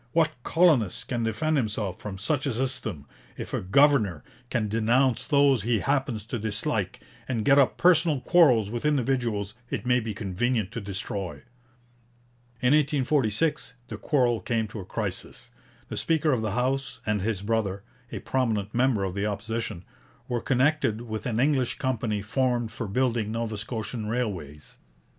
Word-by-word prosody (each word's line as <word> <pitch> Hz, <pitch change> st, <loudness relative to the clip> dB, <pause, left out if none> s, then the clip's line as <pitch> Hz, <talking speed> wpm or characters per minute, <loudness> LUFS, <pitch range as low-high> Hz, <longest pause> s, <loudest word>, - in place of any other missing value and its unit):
What 165 Hz, -2 st, +3 dB
colonist 155 Hz, -, +2 dB
can 120 Hz, -2 st, -1 dB
defend 150 Hz, +8 st, 0 dB
himself 105 Hz, -6 st, -2 dB
from 100 Hz, -2 st, -6 dB
such 130 Hz, +8 st, -1 dB
a 135 Hz, -, 0 dB
system, 110 Hz, -, -3 dB, 0.3 s
if -, -, -6 dB
a -, -, 0 dB
governor 105 Hz, -, +3 dB, 0.3 s
can 120 Hz, -4 st, 0 dB
denounce 115 Hz, +4 st, +2 dB
those 140 Hz, -5 st, +4 dB
he 115 Hz, 0 st, +1 dB
happens 135 Hz, -7 st, -1 dB
to 120 Hz, +1 st, -4 dB
dislike 110 Hz, -1 st, -2 dB, 0.3 s
and 115 Hz, -5 st, -2 dB
get 140 Hz, +1 st, +6 dB
up 135 Hz, -, +3 dB
personal 165 Hz, -4 st, +4 dB
quarrels 125 Hz, -, +4 dB
with 120 Hz, 0 st, -4 dB
individuals 125 Hz, -8 st, 0 dB, 0.2 s
it -, -, -3 dB
may 125 Hz, 0 st, +3 dB
be 110 Hz, -3 st, -4 dB
convenient 105 Hz, +2 st, -1 dB
to 115 Hz, -, -5 dB
destroy?' 95 Hz, -1 st, -5 dB, 1.2 s
In 125 Hz, +3 st, +5 dB
1846 150 Hz, -1 st, +1 dB, 0.2 s
the -, -, -5 dB
quarrel 125 Hz, -6 st, +1 dB
came 110 Hz, +3 st, -1 dB
to 110 Hz, -, -7 dB
a 95 Hz, -, -7 dB
crisis. -, -, -5 dB, 0.4 s
The -, -, -6 dB
speaker 160 Hz, -2 st, +1 dB
of 125 Hz, -4 st, +1 dB
the 110 Hz, -3 st, -2 dB
House 135 Hz, +3 st, -1 dB
and 105 Hz, -2 st, 0 dB
his 100 Hz, -1 st, -2 dB
brother, 100 Hz, -3 st, -1 dB, 0.3 s
a -, -, -4 dB
prominent 110 Hz, -6 st, -1 dB
member 125 Hz, -4 st, +2 dB
of 95 Hz, -2 st, -2 dB
the 100 Hz, +2 st, -1 dB
Opposition, 110 Hz, -3 st, -4 dB, 0.4 s
were 120 Hz, -2 st, -1 dB
connected 130 Hz, -4 st, +1 dB
with 110 Hz, -1 st, -5 dB
an 115 Hz, -2 st, -1 dB
English 135 Hz, -2 st, +1 dB
company 115 Hz, -5 st, -1 dB
formed 120 Hz, 0 st, 0 dB
for 115 Hz, -, -5 dB
building 115 Hz, 0 st, 0 dB
Nova 115 Hz, -1 st, -2 dB
Scotian 110 Hz, +1 st, -4 dB
railways. 95 Hz, -, -4 dB
115 Hz, 155 wpm, -26 LUFS, 105-135 Hz, 1.2 s, get